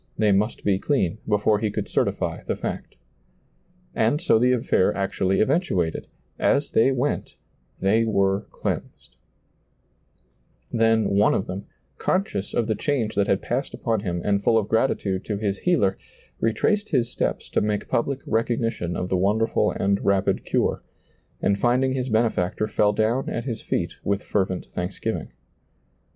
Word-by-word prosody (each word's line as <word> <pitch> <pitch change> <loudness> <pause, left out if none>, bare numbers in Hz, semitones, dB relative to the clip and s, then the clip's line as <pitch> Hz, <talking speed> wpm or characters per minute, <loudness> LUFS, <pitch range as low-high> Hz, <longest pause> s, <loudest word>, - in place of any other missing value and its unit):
They 105 -2 +3
must 105 +4 +1
be 95 -2 +2
clean 110 - 0
before 105 0 +2
he 110 0 0
could 105 - -3
certily - - -1
the - - 0
fact - - -5 1.0
And 115 +7 +2
so 170 -10 +3
the 125 +2 +4
ailair 115 -5 +2
actually 95 -1 0
eventuated; 110 - 0 0.2
" - - -38 0.2
as 145 - -2
they 115 +4 +4
went, 135 +2 -2 0.4
they 110 +4 +3
were 100 -2 +1
cleansed," - - -5 1.6
Then 115 -1 +3
one 100 +1 +4
of 95 - -1
them, 95 +2 -6 0.3
conscious 185 - -1
of 115 - +2
the 110 - 0
change 115 -1 -1
that 100 -1 +1
had 95 - +1
passed 130 +4 -2
upon 115 -3 -1
him 90 -4 -3
and 100 -1 +2
full 115 - +3
of 105 -2 +1
gratitude 105 -5 0
to 105 - -2
his 100 -2 -2
Healer, 150 - +1 0.4
retraced 205 - +1
his 125 -6 +1
steps - - -2
to - - +2
make 105 0 -1
public 135 +3 -1
recognition 115 -6 -1
of 90 - -2
the 95 - +1
wonderful 105 +5 +2
and 100 0 0
rapid 100 -1 +1
cure, - - 0 0.6
and 100 0 +2
finding 125 +3 +2
his 130 -1 -2
Benefactor 110 -3 +1
fell 105 -1 +2
down 110 +5 0
at 115 - -3
His 115 -5 -4
feet - - -2
with 100 0 -1
fervent 95 -2 -1
thanksgiving. 90 +2 -4
110 Hz, 155 wpm, -24 LUFS, 100-120 Hz, 1.6 s, the